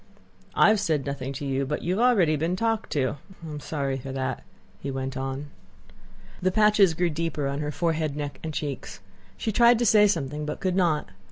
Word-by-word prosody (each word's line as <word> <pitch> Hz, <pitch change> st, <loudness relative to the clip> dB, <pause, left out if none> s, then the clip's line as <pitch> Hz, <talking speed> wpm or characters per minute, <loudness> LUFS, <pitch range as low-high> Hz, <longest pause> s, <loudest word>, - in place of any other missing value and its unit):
"I -, -, +6 dB
have 215 Hz, -1 st, +3 dB
said 160 Hz, -8 st, 0 dB
nothing 140 Hz, -1 st, -4 dB
to 140 Hz, +1 st, -5 dB
you, 135 Hz, 0 st, 0 dB
but 150 Hz, +2 st, -3 dB
you 185 Hz, +4 st, 0 dB
have -, -, +3 dB
already 180 Hz, -11 st, +4 dB
been 165 Hz, +4 st, 0 dB
talked 225 Hz, +2 st, -1 dB
to. 135 Hz, -1 st, 0 dB, 0.3 s
And 160 Hz, -, -7 dB
I -, -, -6 dB
am 150 Hz, -, -5 dB
sorry 140 Hz, -3 st, -2 dB
for 135 Hz, +1 st, -7 dB
that," 130 Hz, -1 st, -3 dB, 0.4 s
he 140 Hz, -, -5 dB
went 135 Hz, -1 st, -4 dB
on. 135 Hz, +2 st, -4 dB, 0.9 s
The 185 Hz, +1 st, +2 dB
patches 210 Hz, -4 st, +4 dB
grew 175 Hz, 0 st, +1 dB
deeper 155 Hz, -2 st, -2 dB
on 140 Hz, +1 st, -2 dB
her 150 Hz, 0 st, -2 dB
forehead, 160 Hz, -3 st, -1 dB
neck, 145 Hz, -1 st, -5 dB
and 160 Hz, -, -3 dB
cheeks. 145 Hz, -2 st, -5 dB, 0.4 s
She 220 Hz, -, -2 dB
tried 235 Hz, +2 st, +5 dB
to 240 Hz, -, +1 dB
say 210 Hz, -1 st, +6 dB
something 150 Hz, -6 st, -1 dB
but 150 Hz, 0 st, -4 dB
could 185 Hz, -1 st, 0 dB
not. 170 Hz, -, +1 dB
150 Hz, 210 wpm, -26 LUFS, 140-185 Hz, 0.9 s, I